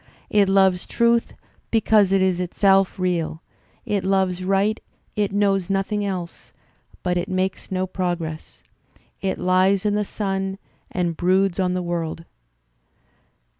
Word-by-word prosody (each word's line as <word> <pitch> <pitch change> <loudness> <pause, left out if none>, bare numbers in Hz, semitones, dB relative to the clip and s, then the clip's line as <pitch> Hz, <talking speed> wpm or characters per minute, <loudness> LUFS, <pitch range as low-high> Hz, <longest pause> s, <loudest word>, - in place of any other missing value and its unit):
It 205 -2 +4
loves 190 -2 +3
truth 235 0 +1 0.3
because 215 -3 +3
it 195 -1 +3
is 185 -2 +1
itself 195 +1 +2
real; 175 -3 -1 0.4
it 205 -2 -1
loves 190 -1 +1
right, 195 +3 +1 0.4
it 205 -2 0
knows 195 -2 +1
nothing 195 +2 0
else; 185 -4 -5 0.5
but 180 -1 0
it 175 +1 -2
makes 185 0 -2
no 185 0 0
progress... 175 -4 -4 0.6
it 190 -1 -1
Ues 185 +2 +2
in 210 - +2
the 210 0 +1
sun 195 -1 -3 0.3
and 175 -2 -1
broods 185 +2 +2
on 180 -1 +1
the 180 - -2
world." 165 -1 -3
190 Hz, 130 wpm, -22 LUFS, 180-195 Hz, 0.6 s, It